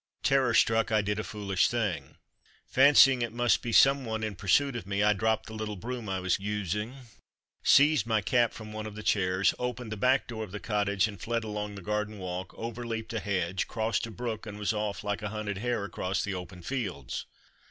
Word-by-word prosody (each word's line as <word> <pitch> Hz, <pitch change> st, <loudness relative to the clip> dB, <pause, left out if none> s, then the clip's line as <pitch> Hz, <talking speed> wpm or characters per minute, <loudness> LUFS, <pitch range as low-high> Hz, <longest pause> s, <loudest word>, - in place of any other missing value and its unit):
Terror 135 Hz, -4 st, +3 dB
struck, 115 Hz, -1 st, +3 dB
I 110 Hz, -1 st, +3 dB
did 105 Hz, +1 st, -1 dB
a -, -, -2 dB
foolish 100 Hz, -3 st, 0 dB
thing. 100 Hz, -, -2 dB, 0.5 s
Fancying 135 Hz, -1 st, +6 dB
it 115 Hz, -1 st, -1 dB
must 120 Hz, 0 st, +2 dB
be 120 Hz, -, -4 dB
some 135 Hz, +4 st, +6 dB
one 110 Hz, -2 st, -3 dB
in 110 Hz, -1 st, -2 dB
pursuit 120 Hz, +9 st, +2 dB
of 115 Hz, -5 st, -5 dB
me, 100 Hz, +1 st, 0 dB
I 105 Hz, 0 st, +5 dB
dropped 110 Hz, +2 st, 0 dB
the 110 Hz, -, -9 dB
little 110 Hz, -1 st, -4 dB
broom 120 Hz, +2 st, -5 dB
I 95 Hz, -1 st, -1 dB
was 90 Hz, 0 st, 0 dB
using, 105 Hz, +3 st, -3 dB, 0.7 s
seized 140 Hz, -5 st, +5 dB
my 110 Hz, -2 st, +2 dB
cap 120 Hz, +3 st, +2 dB
from 110 Hz, -1 st, -9 dB
one 110 Hz, 0 st, -5 dB
of 105 Hz, -, -9 dB
the 110 Hz, -, -7 dB
chairs, 95 Hz, -2 st, +2 dB
opened 125 Hz, -2 st, -4 dB
the 110 Hz, -, -4 dB
back 130 Hz, +5 st, +3 dB
door 110 Hz, -2 st, -5 dB
of 105 Hz, -, -8 dB
the 105 Hz, -, -5 dB
cottage, 100 Hz, -2 st, +1 dB
and 100 Hz, -5 st, -9 dB
fled 115 Hz, 0 st, -1 dB
along 105 Hz, -1 st, -4 dB
the 100 Hz, -, -9 dB
garden 105 Hz, +1 st, -2 dB
walk, 90 Hz, -1 st, -5 dB
over 115 Hz, +1 st, -5 dB
leaped 115 Hz, -1 st, -4 dB
a 115 Hz, -, -1 dB
hedge, 95 Hz, -2 st, -1 dB
crossed 115 Hz, 0 st, -1 dB
a -, -, -8 dB
brook, 115 Hz, -1 st, -5 dB
and 105 Hz, -1 st, -7 dB
was 105 Hz, +1 st, 0 dB
off 105 Hz, 0 st, -3 dB
like 100 Hz, -1 st, -2 dB
a 105 Hz, -, -3 dB
hunted 105 Hz, -2 st, -4 dB
hare 120 Hz, -2 st, -1 dB
across 95 Hz, -1 st, -2 dB
the 100 Hz, -, -2 dB
open 90 Hz, -1 st, -7 dB
fields. 95 Hz, -, -4 dB
105 Hz, 215 wpm, -29 LUFS, 100-115 Hz, 0.7 s, Fancying